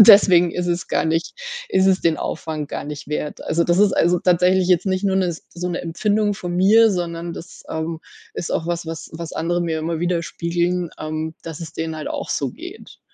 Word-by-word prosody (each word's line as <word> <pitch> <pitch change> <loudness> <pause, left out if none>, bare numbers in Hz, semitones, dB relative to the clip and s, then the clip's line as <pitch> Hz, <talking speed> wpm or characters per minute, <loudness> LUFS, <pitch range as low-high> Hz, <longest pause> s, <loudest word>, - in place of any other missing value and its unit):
und 210 - +9
deswegen 185 -5 +8
ist 180 0 -2
es 175 0 -1
gar - - +1
nicht 165 +1 0 0.4
ist 190 - +3
es 190 0 +4
den 165 -2 +2
Aufwand 155 -2 -4
gar - - -4
nicht 145 -1 -7
wert. 150 0 -3
Also, 170 +1 +1
das 175 +1 +2
ist, 205 0 +5
also, 175 +1 +3
tatsächlich 180 +1 +3
jetzt 180 +1 +3
nicht 185 +1 0
nur 190 -1 +2
'ne 190 -1 +2
s 170 -2 -5
so 180 +1 -3
'ne 175 - -2
Empfindung 205 +5 +1
von 175 -2 -4
mir, 215 +5 +6
sondern 170 -2 -3
das, 170 +2 -10
ähm, 160 0 -3 0.3
ist 175 - -4
auch 160 - -1
was, 170 0 -2
was 165 0 -6
was 165 0 -6
andere 175 +2 0
mir 160 -2 -1
immer 160 +1 -2
widerspiegeln, 175 0 -1
ähm, 155 +1 -3
dass 165 -1 -7
es 165 -1 -7
denen 160 0 -3
halt 155 - -4
auch - - -4
so - - 0
geht. - - -11
170 Hz, 220 wpm, -21 LUFS, 165-180 Hz, 0.4 s, und